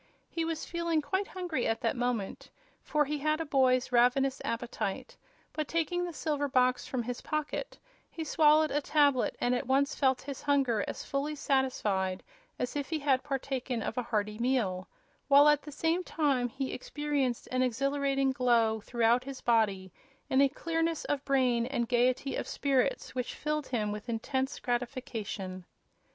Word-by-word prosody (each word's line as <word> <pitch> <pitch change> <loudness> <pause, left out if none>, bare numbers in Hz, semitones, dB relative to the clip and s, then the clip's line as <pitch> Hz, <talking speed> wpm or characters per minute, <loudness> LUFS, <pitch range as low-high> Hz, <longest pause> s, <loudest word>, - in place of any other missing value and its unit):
He 335 - -1
was 325 -1 -3
feeling 340 -2 0
quite 380 +6 -1
hungry 350 -9 -2
at 225 - 0
that 230 - 0
moment, 245 -5 -2 0.3
for 300 -1 +1
he 295 +1 -3
had 305 +2 +1
a 325 - -2
boy's 260 -3 +2
ravenous 255 +3 +3
appetite; 230 -4 -3 0.4
but, 310 -2 -2
taking 335 +2 0
the 350 - -4
silver 295 -2 -1
box 255 -1 +2
from 255 -2 -2
his 245 +1 -5
pocket, 305 +10 -3 0.3
he 325 - -5
swallowed 310 0 +4
a 295 - +1
tablet 285 -3 +2
and 245 - +1
at 250 +1 -1
once 275 +2 +2
felt 265 -2 +1
his 275 -1 -6
hunger 270 -7 +2
as - - -5
fully 285 +2 -2
satisfied 215 -10 0 0.3
as 250 - -3
if 285 -1 -3
he 320 - 0
had 275 -3 +2
partaken 265 -4 -3
of - - -3
a 250 - 0
hearty 210 -2 -2
meal, 225 -8 0 0.4
while 285 +1 +7
at 295 -1 +5
the 300 - -9
same 330 +5 0
time 275 -8 0
he 265 +3 -4
experienced 285 -3 -2
an 255 0 +1
exhilarating 275 +2 +1
glow 235 -4 +2
throughout 235 +2 +2
his 275 -1 -6
body 200 -6 +1 0.4
and 265 - +5
a 280 - +5
clearness 330 +2 -1
of 285 -1 -1
brain 250 -4 +2
and 240 -3 -1
gaiety 250 +3 +1
of - - -3
spirits 275 -1 0
which 250 -1 -3
filled 300 -1 -2
him 215 -4 -1
with 210 +3 -6
intense 265 +4 -2
gratification. 235 -7 -4
265 Hz, 170 wpm, -30 LUFS, 240-295 Hz, 0.4 s, while